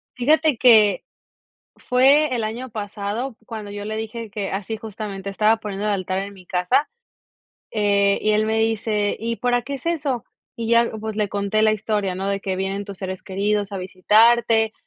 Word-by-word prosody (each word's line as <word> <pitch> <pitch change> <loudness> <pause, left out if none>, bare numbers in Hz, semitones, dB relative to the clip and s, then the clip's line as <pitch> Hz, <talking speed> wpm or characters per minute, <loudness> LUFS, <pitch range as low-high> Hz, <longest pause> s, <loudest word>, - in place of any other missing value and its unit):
Fíjate 300 +1 +3
que 220 -5 +5 0.7
fue 270 +3 +3
el 230 -2 -1
año 235 +4 -4
pasado 210 +3 -4
cuando 215 -3 -7
yo 205 0 -6
le 215 +1 -4
dije 225 0 -6
que, 200 -2 -4
así 200 +3 -3
justamente, 210 -2 -6
estaba 215 +3 +3
poniendo 210 -2 -5
el 210 - +1
altar 185 -1 -2
en 200 +1 -5
mi 185 -2 -15
casa, 180 +11 +1 0.8
eh, 200 -2 +2
y 215 - +1
él 215 0 +2
me 220 0 0
dice: 220 -2 0
"¿Y 230 +1 -3
para 245 0 +1
qué 280 +4 -5
es 270 +3 -9
eso?". 290 -8 -1 0.3
Y 230 -1 -4
ya, 235 0 +4
pues 220 0 -4
le 210 -1 0
conté 200 +2 0
la 215 0 +4
historia, 210 -3 -1
¿no? 190 +1 -3
De 200 0 -1
que 190 -1 -3
vienen 195 +1 -2
tus 200 -2 -9
seres 185 -1 -5
queridos 200 +1 -1
a 200 - -4
visitarte, 220 +4 +3
215 Hz, 185 wpm, -22 LUFS, 200-230 Hz, 0.8 s, que